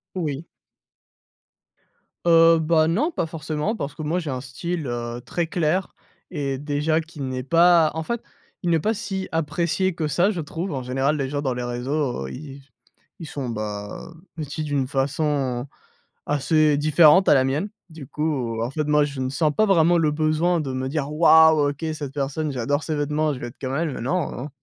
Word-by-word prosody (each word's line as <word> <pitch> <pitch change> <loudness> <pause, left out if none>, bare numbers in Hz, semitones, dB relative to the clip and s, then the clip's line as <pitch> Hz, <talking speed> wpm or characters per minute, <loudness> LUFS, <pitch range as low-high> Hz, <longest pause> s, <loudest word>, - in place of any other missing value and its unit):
Oui. 155 -3 -3 1.8
Heu, 165 0 +6
bah, 160 0 +3
non, 225 - +1
pas 315 - -2
forcément 155 +5 -3
parce 140 -9 -5
que 155 - -7
moi 160 +4 0
j'ai 165 -4 -4
un 130 -1 -4
style, 155 +5 -4
heu, 120 0 -4
très 170 +5 -2
clair 175 +2 -1 0.4
et 140 -5 -3
déjà 150 +2 0
qui 160 -1 -12
n'est 130 -1 -3
pas 170 +2 +5
en 160 - -2
fait, 235 +7 -3 0.4
il 175 - -1
n'est 165 - +4
pas 215 +7 +1
si 195 -2 -4
apprécié 170 +4 0
que 160 -2 -2
ça 175 +8 +2
je 180 -5 -3
trouve. 170 +4 -5
En 130 - -3
général, 135 +4 0
les 135 -2 -2
gens 145 -1 -2
dans 130 -3 -1
les 125 - -4
réseaux, 120 - -2
heu, - - -8
ils 140 0 -8
s 140 - -16 0.6
ils 160 - -6
sont, 135 -4 -5
bah, 105 +5 -6 0.2
vêtus 155 0 -4
d'une 145 -3 -1
façon 135 -2 -1 0.6
assez 150 +1 +2
différente 155 +4 +5
à - - +8
la 130 -2 +4
mienne. 150 +10 -1 0.2
Du 160 -4 -10
coup, 130 -7 -2
en 115 - -1
fait, 150 +1 -2
moi, 150 0 +3
je 140 -2 -7
ne 130 - -1
sens 150 +2 +1
pas 215 - +4
vraiment 175 -3 +4
le 155 -2 +2
besoin 155 +3 +1
de 135 -3 -4
me 130 0 -2
dire 145 0 -2
«Waouh! 160 -2 +6
OK, 145 +3 -7
cette 145 -3 -6
personne, 145 +2 -2
j'adore 145 +4 -1
ses 155 0 -2
vêtements, 150 +1 0
je 130 - -7
veux 120 - -5
être 120 - -12
comme 130 0 -3
elle», 155 -3 -2
non, 140 0 -2
150 Hz, 195 wpm, -23 LUFS, 135-165 Hz, 1.8 s, à